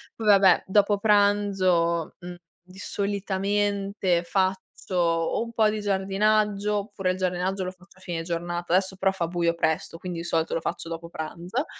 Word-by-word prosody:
poi 225 - -6
vabbè, 195 -3 +6
dopo 205 +1 +3
pranzo, 195 -5 +2
mhmm, 175 0 -8 0.3
di 185 +1 -17
solitamente 200 -2 -1
faccio 190 +1 0 0.3
o 165 +3 +1
un 230 - -8
po' 220 -1 +3
di 215 0 -3
giardinaggio 205 +1 +1
oppure 195 -3 -2
il 185 - -4
giardinaggio 185 +1 -1
lo 185 - -3
faccio 185 +1 -22
a - - -20
fine 175 -3 -4
giornata, 175 0 -3
adesso 190 +1 +2
però 190 0 +1
fa 175 -3 -2
buio 170 -1 0
presto, 165 0 -1
quindi 180 -2 -5
di 170 - -5
solito 165 -1 0
lo 165 - -1
faccio 165 - -4
dopo 165 0 -6
pranzo. 175 - -4
190 Hz, 170 wpm, -25 LUFS, 175-200 Hz, 0.3 s, vabbè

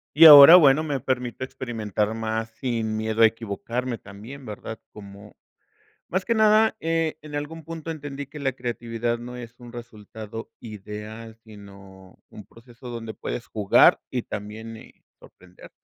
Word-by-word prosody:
y 165 +2 +8
ahora 150 +1 +12
bueno, 150 -3 +5
me 145 -3 -2
permito 125 -1 -3
experimentar 110 -5 -3
más 110 0 -4
sin 115 -3 -3
miedo 110 +1 0
a - - +10
equivocarme, 115 +3 -3
también, 110 +8 -12
¿verdad?, 110 0 -8
como, 100 0 -13 0.8
más 185 +1 -2
que 230 - +1
nada, 220 0 +4
eh, 165 -1 -1
en 150 -1 -11
algún 155 +2 -6
punto 165 +1 -7
entendí 145 -3 -7
que 150 +3 -11
la 135 -2 -1
creatividad 120 -1 -4
no 125 +1 -9
es 120 -1 -10
un 120 -1 -13
resultado 110 -1 -10
ideal, 110 +1 -9
sino, 100 -3 -15
un 105 - -12
proceso 120 +3 -15
donde 115 -2 -7
puedes 120 - -6
jugar 105 -2 +4
y 125 - -2
también, 110 +2 -8
eh, - - -15 0.3
sorprenderte. 90 0 -17
115 Hz, 150 wpm, -24 LUFS, 110-140 Hz, 0.8 s, ahora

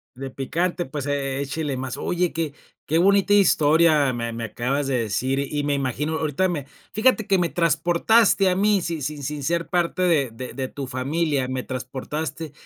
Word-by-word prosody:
De 135 +1 -6
picante, 170 +7 -2
pues, 135 +1 -5
e 140 -1 -2
échele 140 0 -3
más. 130 -1 -4
Oye, 180 0 -1
qué 160 -3 -2 0.3
qué 160 - +1
bonita 200 +3 +4
historia 155 -6 +4
me 115 -1 -3
me 115 - -5
acabas 135 +5 -2
de 130 -3 +1
decir, 130 +5 -1
y 145 +1 -2
me 145 0 0
imagino, 140 +4 -1
ahorita 160 +4 0
me 145 -6 -3 0.3
fíjate 220 0 +3
que 195 - +3
me 175 -1 +1
transportaste 175 +6 +3
a 180 - +1
mí 205 -1 +3
sin 165 -3 -3
sin 145 +1 -4
sin 150 +1 -4
ser 170 +4 -1
parte 175 0 0
de 160 -8 +3
de 125 +3 -7
de 130 -1 -4
tu 140 +1 -6
familia, 140 +1 -1
me 130 -1 -3
transportaste. 135 +4 -5
150 Hz, 185 wpm, -23 LUFS, 135-170 Hz, 0.3 s, bonita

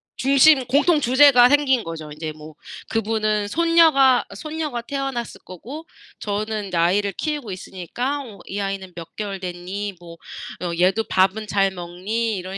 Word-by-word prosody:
중심 275 0 +4
공통 295 +5 +3
주제가 260 -1 +6
생긴 265 -3 +2
거죠. 160 -2 -7
인제 155 +1 -6
뭐 155 0 -13 0.3
그분은 215 -1 0
손녀가 320 -6 +4
손녀가 305 -2 -4
태어났을 270 -2 -4
거고 255 - -9 0.3
저는 210 0 -3
인제 180 -3 -4
아이를 195 +4 +2
키우고 290 - -4
있으니까 240 - -4
뭐 215 -5 -12
"이 200 - -4
아이는 195 -2 -4
몇 165 -1 -10
개월 200 -2 -5
됐니?" 185 +3 -5
뭐 170 -1 -12 0.5
"어 175 - -2
얘도 190 +5 +3
밥은 195 +3 +1
잘 195 -1 +2
먹니?" 190 +5 -3
이런 185 +2 -6
215 Hz, 305 characters per minute, -22 LUFS, 185-265 Hz, 0.5 s, 주제가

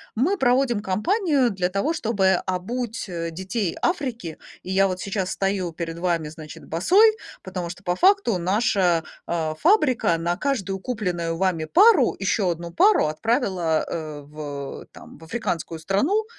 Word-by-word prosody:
мы 340 - +1
проводим 250 -3 +2
компанию 275 - +1
для 185 -2 -1
того, 200 - 0
чтобы 200 - +1
обуть, 225 +5 -3
э, 170 -1 -3
детей 190 +2 -3
Африки. 250 - -2 0.3
И 185 - -6
я 195 +1 +4
вот 185 -1 -3
сейчас 195 -2 -2
стою 195 -3 -1
перед 165 0 -5
вами, 170 -4 -1
значит, 155 -1 -11
босой. 400 - +4 0.3
Потому 180 -2 -5
что 180 +2 -9
по 175 0 0
факту 380 - +3
наша, 185 -3 +1 0.2
э, 160 -2 -1
фабрика 280 - +3
на 170 +1 -1
каждую 200 -9 -2
купленную 180 -8 -3
вами 180 -4 0
пару 370 - +5
ещё 195 -1 0
одну 170 0 -4
пару 400 - +4
отправила, 185 - 0
э, 155 -3 -5
в 145 -1 -7
там, - - -14
в - - -15
африканскую 170 -4 -4
страну. 275 - +1
190 Hz, 150 wpm, -23 LUFS, 170-245 Hz, 0.3 s, пару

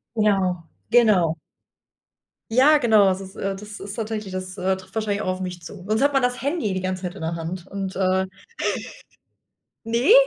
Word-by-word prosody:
Ja, 195 -5 +2 0.3
genau. 210 -9 +4 1.2
Ja, 290 +5 +6
genau. 220 -5 +5
Das 190 0 +2
ist 190 0 -10
äh, 195 0 -2
das 210 +1 -9
ist 200 0 -6
tatsächlich 215 -3 -4
das, 185 +1 -5
äh, 190 0 +1
trifft 190 0 -13
wahrscheinlich 210 -2 -1
auch - - -4
auf 185 0 -1
mich 180 -2 -5
zu. 180 +2 -10
Sonst 215 +3 +1
hat 285 - +4
man 270 -1 +3
das 245 0 0
Handy 280 - 0
die 185 - -2
ganze 185 0 -3
Zeit 180 +1 -4
in - - -9
der 165 +1 -2
Hand 170 +2 -5
und, 195 -1 -5
äh 190 0 +2 1.6
Ne? 235 - +4
195 Hz, 185 wpm, -23 LUFS, 185-220 Hz, 1.6 s, Ja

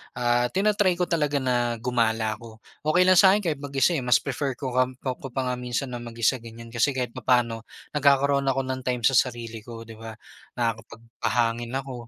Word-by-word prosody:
ah, 120 0 +2
tina-try 200 - +2
ko 180 - 0
talaga 145 -4 +1
na 120 -2 +1
gumala 115 -2 0
ako. 110 -1 -13 0.2
Okey 180 +4 +4
lang 185 -1 +6
sa 195 0 +7
akin 210 - -1
kahit 145 - -5
mag-isa, 140 +3 +1
eh, 160 - 0
mas 125 -1 +2
prefer 135 -3 -2
ko 130 -1 -5
ngamp 130 0 0
ko 130 0 -4
pa 130 +1 -3
nga 125 -1 -2
minsan 125 +1 -3
na 120 - -5
mag-isa 120 +1 -1
ganiyan. 115 0 -11
Kasi 130 +4 +1
kahit 125 -2 -2
papaano 115 -3 0 0.2
nagkakaroon 140 -1 +3
ako 135 0 +1
ng 130 0 -3
time 125 -2 -1
sa 135 - +5
sarili 120 -3 0
ko, 115 +1 -10
di 115 - -13
ba? 115 -1 -8 0.4
Nakakapagpahangin 115 +1 -2
ako, 125 -3 -8
125 Hz, 195 wpm, -25 LUFS, 115-135 Hz, 0.4 s, sa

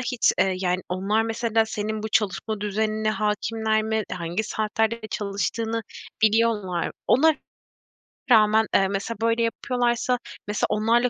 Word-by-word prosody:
hiç, 250 -2 +2
eee, 190 -1 +3
yani, 180 -1 0
onlar 195 +4 +1
mesela 225 0 +1
senin 215 0 -3
bu 220 - -3
çalışma 215 0 -1
düzenine 215 +1 0
hâkimler 220 +1 0
mi? 220 - -5 0.2
Hangi 175 +2 -2
saatlerde 220 +2 -1
de - - -5
çalıştığını 220 +3 -2 0.4
biliyorlar 215 -5 +2
mı? - - -6
Ona 315 +5 +5 1.0
rağmen, 220 -1 +5
eee, 195 - +4
mesela 200 +3 -3
böyle 230 +1 +2
yapıyorlarsa, 245 0 0 0.3
mesela 210 0 0
onlarla 230 +3 +2
220 Hz, 135 wpm, -24 LUFS, 210-230 Hz, 1.0 s, Ona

